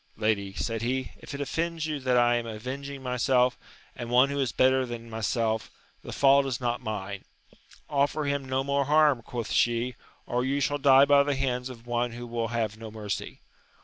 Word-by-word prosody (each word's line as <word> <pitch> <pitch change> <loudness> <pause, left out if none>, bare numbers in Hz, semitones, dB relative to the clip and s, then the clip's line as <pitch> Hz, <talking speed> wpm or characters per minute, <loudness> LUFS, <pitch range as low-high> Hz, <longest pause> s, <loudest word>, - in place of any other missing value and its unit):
Lady, 100 -3 0
said 115 +1 -2
he, 130 +2 -2
if - - -8
it 140 - -5
offends 165 +2 -2
you 155 -2 -3
that 130 -2 +1
I 120 0 +4
am 120 -1 -4
avenging 130 +5 -6
myself, 125 0 +2 0.4
and 120 -1 -6
one 125 +3 +5
who 140 0 -2
is 130 -4 0
better 130 0 +3
than 120 -2 -7
myself, 110 0 -1 0.3
the - - -8
fault 140 0 +4
is 130 -3 -2
not 120 -1 -1
mine. 100 -2 -5 0.6
Offer 145 +1 +1
him 140 -1 -1
no 130 0 -1
more 140 0 0
harm, 150 -3 +4
quoth 115 -1 -5
she, 120 +1 +1 0.3
or 125 +1 -1
you 135 +2 0
shall 145 +1 0
die 135 -1 +7
by 140 0 +6
the 140 0 0
hands 130 -1 -1
of 120 -2 -11
one 120 0 -1
who 120 +1 -7
will 115 -1 -2
have 110 -2 -2
no 115 -1 -7
mercy. 105 -2 -5
125 Hz, 195 wpm, -27 LUFS, 115-140 Hz, 0.6 s, die